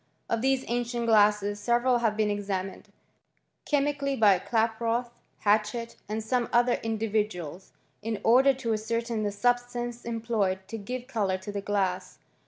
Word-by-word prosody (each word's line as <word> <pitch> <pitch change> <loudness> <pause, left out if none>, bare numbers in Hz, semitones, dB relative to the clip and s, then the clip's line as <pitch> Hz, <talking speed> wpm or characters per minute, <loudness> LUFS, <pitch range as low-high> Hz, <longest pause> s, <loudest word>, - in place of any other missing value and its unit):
Of 230 - +1
these 265 0 +1
ancient 240 0 -1
glasses 210 -2 +3
several 240 +2 +2
have 220 -3 0
been 215 -1 +2
examined 195 -2 -4 0.8
cbet 285 -1 +3
mically 275 -2 -2
by 200 -4 +6
Klaproth, 230 +2 0 0.3
Hatchett, 215 +3 +1
and 215 +1 -2
some 240 +1 0
other 240 0 +3
indi* 225 0 -2
viduals, 190 -5 -2 0.3
in 220 0 -3
order 260 +4 +6
to 240 -4 -2
ascertain 230 +1 -2
the 205 -1 -1
substances 240 +2 -1
employed 220 -5 -1
to 225 - -5
give 245 +4 -5
colour 205 -7 -1
to 190 +2 -7
the 200 0 -3
glass. 190 -2 -1
225 Hz, 150 wpm, -28 LUFS, 205-240 Hz, 0.8 s, by